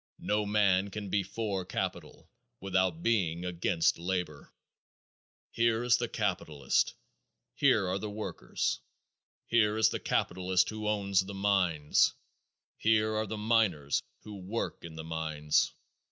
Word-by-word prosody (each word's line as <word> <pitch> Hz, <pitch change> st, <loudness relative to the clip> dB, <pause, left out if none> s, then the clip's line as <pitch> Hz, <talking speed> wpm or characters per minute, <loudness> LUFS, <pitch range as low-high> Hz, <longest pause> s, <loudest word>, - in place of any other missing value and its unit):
No 105 Hz, 0 st, 0 dB
man 100 Hz, -2 st, +3 dB
can 100 Hz, 0 st, -6 dB
be 100 Hz, +1 st, +2 dB
for 100 Hz, 0 st, -3 dB
capital 90 Hz, -, -5 dB, 0.3 s
without 95 Hz, -3 st, 0 dB
being 90 Hz, -7 st, +1 dB
against 85 Hz, -2 st, +1 dB
labor. 90 Hz, -4 st, -3 dB, 1.0 s
Here 115 Hz, 0 st, +1 dB
is 120 Hz, 0 st, +4 dB
the 120 Hz, -, -2 dB
capitalist; 75 Hz, -2 st, 0 dB, 0.6 s
here 95 Hz, -, +3 dB
are 95 Hz, +2 st, -1 dB
the 105 Hz, -, -4 dB
workers. 105 Hz, +1 st, -3 dB, 0.7 s
Here 110 Hz, -2 st, +2 dB
is 110 Hz, -, +5 dB
the -, -, -3 dB
capitalist 95 Hz, 0 st, +1 dB
who 110 Hz, 0 st, -4 dB
owns 100 Hz, -3 st, +2 dB
the 100 Hz, +1 st, -8 dB
mines; 90 Hz, -7 st, +2 dB, 0.6 s
here 110 Hz, 0 st, +3 dB
are 110 Hz, 0 st, -1 dB
the 110 Hz, -, -4 dB
miners 105 Hz, -10 st, +1 dB, 0.2 s
who 105 Hz, -1 st, -9 dB
work 100 Hz, +5 st, -4 dB
in 85 Hz, -2 st, -9 dB
the 80 Hz, -, -6 dB
mines. 80 Hz, -2 st, 0 dB
95 Hz, 130 wpm, -30 LUFS, 90-105 Hz, 1.0 s, is